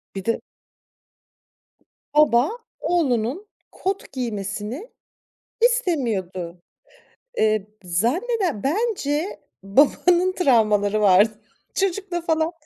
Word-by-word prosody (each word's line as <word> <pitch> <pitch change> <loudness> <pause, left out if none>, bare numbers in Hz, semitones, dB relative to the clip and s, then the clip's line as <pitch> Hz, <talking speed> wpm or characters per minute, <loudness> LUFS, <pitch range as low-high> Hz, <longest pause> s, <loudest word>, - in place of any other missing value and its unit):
Bir 195 - -5
de 230 - 0 1.7
Baba 290 -2 +5 0.3
oğlunun 290 - 0 0.2
kot 390 +1 -4
giymesini 220 - -4 0.7
istemiyordu. 225 - 0 0.8
Eee, 215 -2 +2 0.2
zannede 285 - 0
bence 340 - -1 0.2
babanın 345 - +3
travmaları 215 - +2
vardı. 205 +2 +4 0.3
Çocukla 380 -2 -1
falan 320 0 0
270 Hz, 70 wpm, -23 LUFS, -, 1.7 s, Baba